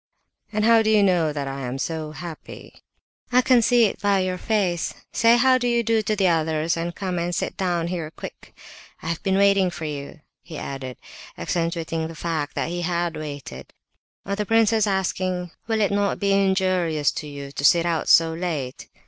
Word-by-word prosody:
"And 215 Hz, 0 st, 0 dB
how 230 Hz, 0 st, +6 dB
do 215 Hz, -, +1 dB
you 215 Hz, -2 st, +5 dB
know 175 Hz, -5 st, +2 dB
that 145 Hz, -2 st, -4 dB
I 135 Hz, 0 st, -5 dB
am 125 Hz, 0 st, -4 dB
'so 155 Hz, +1 st, -3 dB
happy'?" 170 Hz, -1 st, -10 dB, 0.5 s
"I 250 Hz, +1 st, +4 dB
can 250 Hz, -2 st, +5 dB
see 240 Hz, 0 st, +4 dB
it 205 Hz, -, -3 dB
by 200 Hz, -2 st, +2 dB
your 185 Hz, -1 st, -2 dB
face! 190 Hz, -7 st, 0 dB, 0.2 s
Say 230 Hz, +1 st, +4 dB
'how 255 Hz, +1 st, +4 dB
do 245 Hz, -, -1 dB
you 235 Hz, -1 st, +2 dB
do' 225 Hz, 0 st, +2 dB
to 215 Hz, 0 st, -1 dB
the 195 Hz, -2 st, +2 dB
others, 160 Hz, -1 st, +1 dB
and 170 Hz, +1 st, -4 dB
come 185 Hz, -3 st, -3 dB
and 175 Hz, +1 st, -2 dB
sit -, -, -2 dB
down 175 Hz, -3 st, -1 dB
here, 170 Hz, -3 st, -3 dB
quick—I've 165 Hz, 0 st, -9 dB
been 190 Hz, 0 st, +1 dB
waiting 200 Hz, -2 st, +4 dB
for 160 Hz, -2 st, -6 dB
you!" 145 Hz, +1 st, -6 dB, 0.2 s
he 165 Hz, -3 st, -9 dB
added, 130 Hz, -3 st, -6 dB, 0.4 s
accentuating 165 Hz, -, -2 dB
the 165 Hz, -, -9 dB
fact 155 Hz, -2 st, -3 dB
that -, -, -1 dB
he 175 Hz, +1 st, -3 dB
had 170 Hz, -1 st, -1 dB
waited. 145 Hz, -, -8 dB, 0.5 s
On 200 Hz, -, -2 dB
the 210 Hz, -, -1 dB
prince's 225 Hz, 0 st, +3 dB
asking, 185 Hz, -2 st, -1 dB, 0.2 s
"Will 220 Hz, -1 st, 0 dB
it 205 Hz, -, +2 dB
not 200 Hz, 0 st, +1 dB
be 200 Hz, -1 st, +1 dB
injurious 185 Hz, -6 st, +2 dB
to 150 Hz, -, -6 dB
you 140 Hz, -1 st, -8 dB
to 140 Hz, -, -6 dB
sit 170 Hz, +3 st, +5 dB
out 165 Hz, -2 st, -1 dB
so 165 Hz, -1 st, +6 dB
late?" 160 Hz, -7 st, -4 dB
175 Hz, 190 wpm, -23 LUFS, 160-200 Hz, 0.5 s, how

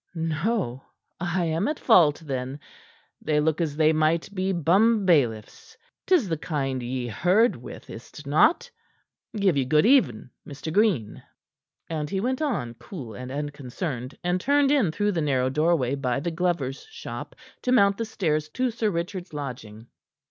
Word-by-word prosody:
"No? 160 Hz, -, -1 dB, 0.4 s
I 175 Hz, 0 st, -1 dB
am 165 Hz, +4 st, 0 dB
at 305 Hz, +1 st, -1 dB
fault, 165 Hz, -, +4 dB
then. 130 Hz, -2 st, -3 dB
Yet 145 Hz, -, -9 dB, 0.6 s
they 150 Hz, -1 st, +1 dB
look 155 Hz, +2 st, +1 dB
as 155 Hz, -3 st, -1 dB
if -, -, -12 dB
they 155 Hz, 0 st, +4 dB
might 160 Hz, +4 st, +1 dB
be 190 Hz, 0 st, -1 dB
bumbailiffs. 175 Hz, -, +2 dB, 0.3 s
'Tis 345 Hz, -, +4 dB
the 160 Hz, -3 st, -2 dB
kind 135 Hz, -6 st, -2 dB
ye 125 Hz, +1 st, -3 dB
herd 180 Hz, -, +2 dB
with, 120 Hz, -, -10 dB
is't 130 Hz, +5 st, -11 dB
not? 180 Hz, -, +3 dB, 0.7 s
Give 195 Hz, -5 st, +2 dB
you 140 Hz, -, +2 dB
good 150 Hz, +6 st, +3 dB
even, 170 Hz, -, +3 dB
Mr. 145 Hz, +2 st, -7 dB
Green." 185 Hz, -, +1 dB, 0.7 s
And 155 Hz, -2 st, -3 dB
he 195 Hz, -, -1 dB
went 255 Hz, +7 st, -1 dB
on, 180 Hz, -, -1 dB
cool 135 Hz, -, -8 dB
and 125 Hz, +3 st, -7 dB
unconcerned, 140 Hz, -2 st, -5 dB
and 180 Hz, +1 st, 0 dB
turned 285 Hz, +2 st, +3 dB
in 255 Hz, -, +3 dB
through 205 Hz, +5 st, 0 dB
the 170 Hz, -4 st, -1 dB
narrow 130 Hz, -3 st, +1 dB
doorway 150 Hz, -3 st, +1 dB
by 130 Hz, -3 st, -1 dB
the 170 Hz, +4 st, -3 dB
glover's 165 Hz, -6 st, -1 dB
shop 465 Hz, +2 st, -8 dB, 0.3 s
to 250 Hz, -, -1 dB
mount 200 Hz, -5 st, +4 dB
the 230 Hz, -, -1 dB
stairs 155 Hz, -8 st, -1 dB
to 250 Hz, +9 st, -1 dB
Sir 225 Hz, -1 st, 0 dB
Richard's 180 Hz, 0 st, -4 dB
lodging. 115 Hz, -6 st, -7 dB
160 Hz, 165 wpm, -25 LUFS, 135-200 Hz, 0.7 s, fault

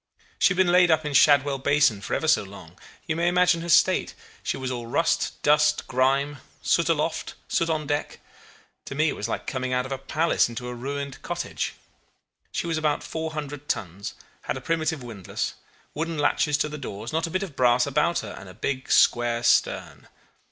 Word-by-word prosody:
She 180 Hz, -, +4 dB
had -, -, -10 dB
been 185 Hz, -2 st, +4 dB
laid 180 Hz, 0 st, +5 dB
up 160 Hz, -1 st, +3 dB
in 150 Hz, -, -3 dB
Shadwell 140 Hz, -1 st, +5 dB
basin 145 Hz, -6 st, +3 dB
for -, -, -2 dB
ever 160 Hz, -, -1 dB
so 155 Hz, -, +4 dB
long. 95 Hz, -4 st, -12 dB, 0.3 s
You 160 Hz, -, -1 dB
may 170 Hz, +1 st, +1 dB
imagine 180 Hz, -1 st, +3 dB
her 170 Hz, -, -6 dB
state. -, -, +3 dB, 0.3 s
She -, -, -2 dB
was 130 Hz, -1 st, -3 dB
all 120 Hz, -2 st, -5 dB
rust, 165 Hz, +8 st, 0 dB
dust, 150 Hz, 0 st, +3 dB
grime 140 Hz, +3 st, +1 dB, 0.3 s
soot -, -, +2 dB
aloft, -, -, -1 dB, 0.2 s
dirt 165 Hz, -, +2 dB
on 155 Hz, -2 st, -1 dB
deck. 145 Hz, 0 st, -2 dB, 0.7 s
To -, -, -6 dB
me 155 Hz, +2 st, +2 dB
it -, -, -3 dB
was 105 Hz, -, -4 dB
like -, -, -3 dB
coming 130 Hz, -1 st, -2 dB
out 125 Hz, 0 st, +1 dB
of 130 Hz, -, -8 dB
a 135 Hz, -, -3 dB
palace 155 Hz, +1 st, +1 dB
into 120 Hz, +1 st, -6 dB
a 125 Hz, -, -4 dB
ruined 140 Hz, +2 st, -5 dB
cottage. -, -, -4 dB, 0.8 s
She -, -, -2 dB
was 165 Hz, -2 st, -1 dB
about 150 Hz, -2 st, 0 dB
400 150 Hz, -3 st, -5 dB
tons, 100 Hz, +1 st, -3 dB, 0.3 s
had -, -, -3 dB
a -, -, -7 dB
primitive 160 Hz, -1 st, -1 dB
windlass, 110 Hz, -6 st, -4 dB, 0.4 s
wooden 165 Hz, +1 st, -3 dB
latches 145 Hz, 0 st, +2 dB
to 145 Hz, -, 0 dB
the 150 Hz, 0 st, -7 dB
doors, 110 Hz, -1 st, -6 dB
not 160 Hz, +1 st, 0 dB
a -, -, -6 dB
bit 185 Hz, +3 st, -1 dB
of 170 Hz, -8 st, -8 dB
brass 125 Hz, -1 st, +4 dB
about 150 Hz, +5 st, +1 dB
her, 105 Hz, -, -7 dB
and 95 Hz, -, -11 dB
a 90 Hz, -, -13 dB
big 130 Hz, +4 st, -3 dB
square 120 Hz, 0 st, +3 dB
stern. -, -, +1 dB
145 Hz, 200 wpm, -25 LUFS, 125-160 Hz, 0.8 s, laid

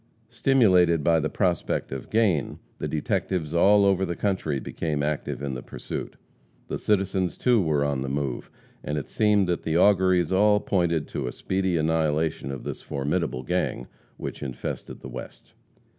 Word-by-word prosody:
Stimulated 95 Hz, -, +4 dB
by 85 Hz, 0 st, +4 dB
the 75 Hz, 0 st, -1 dB
prospect 90 Hz, -5 st, -1 dB
of 65 Hz, -2 st, -6 dB
gain, 105 Hz, -, +1 dB, 0.2 s
the -, -, -2 dB
detectives 80 Hz, +1 st, -2 dB
all 100 Hz, +4 st, +5 dB
over 95 Hz, -1 st, +3 dB
the 85 Hz, -2 st, -2 dB
country 95 Hz, -9 st, -1 dB
became 75 Hz, +1 st, -3 dB
active 75 Hz, -1 st, -2 dB
in 70 Hz, -2 st, -2 dB
the 65 Hz, -, -5 dB
pursuit. -, -, -6 dB, 0.5 s
The -, -, -3 dB
citizens, 95 Hz, -3 st, 0 dB
too, 120 Hz, -4 st, +3 dB
were 75 Hz, -4 st, +1 dB
on 70 Hz, -2 st, -1 dB
the 65 Hz, -, -3 dB
move, 70 Hz, -3 st, -3 dB, 0.3 s
and 75 Hz, +1 st, -2 dB
it 75 Hz, -, -5 dB
seemed 105 Hz, -2 st, +3 dB
that 90 Hz, -1 st, 0 dB
the 80 Hz, +1 st, 0 dB
auguries 95 Hz, -3 st, +4 dB
all 105 Hz, +2 st, +4 dB
pointed 85 Hz, -7 st, 0 dB
to 65 Hz, -, -3 dB
a -, -, -3 dB
speedy 95 Hz, +2 st, -1 dB
annihilation 80 Hz, -2 st, 0 dB
of 65 Hz, -, -6 dB
this -, -, -5 dB
formidable 70 Hz, -2 st, -2 dB
gang 60 Hz, 0 st, -1 dB, 0.3 s
which -, -, -6 dB
infested 65 Hz, -4 st, -6 dB
the -, -, -8 dB
West. 65 Hz, 0 st, -10 dB
85 Hz, 165 wpm, -25 LUFS, 70-95 Hz, 0.5 s, all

